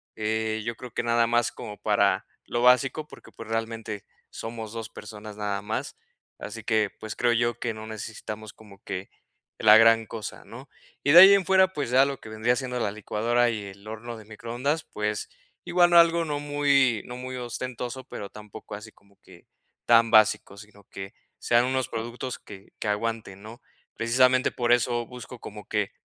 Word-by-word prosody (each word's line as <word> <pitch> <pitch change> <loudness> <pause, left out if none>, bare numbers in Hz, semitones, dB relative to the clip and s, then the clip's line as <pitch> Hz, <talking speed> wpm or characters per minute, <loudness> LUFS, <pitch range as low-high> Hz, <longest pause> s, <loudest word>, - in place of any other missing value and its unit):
eh, 110 0 -1
yo 115 0 -3
creo 125 +2 -9
que - - -2
nada 115 0 +2
más 120 0 +2
como 105 - -8
para - - +2 0.2
lo 120 - -2
básico 135 +5 +3
porque, - - -15
pues, 115 - -10
realmente 115 -2 -4 0.3
somos 115 -1 -7
2 115 -1 -6
personas 105 0 -10
nada 105 -1 -2
más, 110 +2 -4 0.4
así - - -7
que, 110 -2 +1
pues, 110 0 -6
creo 120 -1 +2
yo 120 0 0
que 115 -2 -3
no 110 0 -8
necesitamos 110 0 -7
como 100 -3 -17
que 95 +1 -6 0.5
la 110 0 +8
gran 115 0 +5
cosa, 110 -2 -7
¿no?, 130 +5 -11 0.4
y 145 - +3
de 170 - +10
ahí 190 +2 +11
en 195 -2 +1
fuera, 190 +1 +5
pues, 145 -7 -3
ya 130 +2 +6
lo 140 -1 -4
que - - -11
vendría 110 +3 +1
siendo 125 -1 -3
la 110 - 0
licuadora 115 +3 0
y 105 -3 -5
el 100 +1 -12
horno 115 +2 -7
de 110 - -13
microondas, 120 +8 -3
pues, 105 0 -3 0.4
igual, 175 0 +4
algo 170 0 +6
no 145 -2 -2
muy, 140 -5 +2
no 125 - -8
muy 130 +1 -6
ostentoso, 125 +1 -5
pero 105 -5 -7
tampoco 105 0 -10
así 105 +2 -10
como 100 -1 -27
que 90 -2 -18 0.4
tan 115 -1 +5
básico, 110 -2 +4
sino 105 -1 -15
que 95 0 -8 0.3
sean 120 0 +3
unos 130 -1 0
productos 120 +3 -5
que, 95 -1 -13
que - - -3
aguanten 105 -2 -3
¿no?, 115 +3 -11 0.3
precisamente 125 +2 +3
por 120 -1 +2
eso 120 0 +1
busco 125 0 -10
como 105 -1 -10
que 105 -2 -1
115 Hz, 185 wpm, -26 LUFS, 105-125 Hz, 0.5 s, ahí